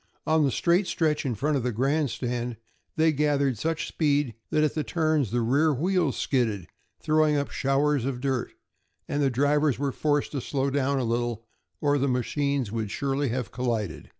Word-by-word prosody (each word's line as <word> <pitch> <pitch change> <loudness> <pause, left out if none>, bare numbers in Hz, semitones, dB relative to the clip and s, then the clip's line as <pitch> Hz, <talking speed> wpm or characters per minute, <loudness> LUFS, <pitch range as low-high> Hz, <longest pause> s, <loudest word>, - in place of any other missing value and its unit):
On 155 0 +3
the 140 - +3
straight 175 - +2
stretch 155 -4 0
in 120 - -1
front 145 +6 0
of - - -1
the 125 +1 -1
grandstand 125 -2 -1 0.4
they 160 -1 +4
gathered 140 -5 +1
such 165 +3 -1
speed 145 -5 +1 0.2
that 155 - +2
at 150 - +1
the 155 - -1
turns 155 - +1
the 120 +3 0
rear 140 +7 +3
wheels 165 +1 0
skidded, 110 - 0 0.3
throwing 155 -1 +2
up 140 - -2
showers 140 0 +1
of 130 -1 -2
dirt, 130 -2 -1 0.6
and 145 - -1
the 140 - +3
drivers 145 +2 +2
were 140 +1 -1
forced 145 +1 0
to 140 - -3
slow 135 +2 -1
down 140 0 +1
a 130 - 0
little 120 -1 -2 0.4
or 145 -1 +2
the 140 - +1
machines 135 -1 -1
would 110 -2 -3
surely 140 +3 -1
have 125 0 -3
collided. 115 -8 -3
140 Hz, 180 wpm, -26 LUFS, 125-150 Hz, 0.6 s, they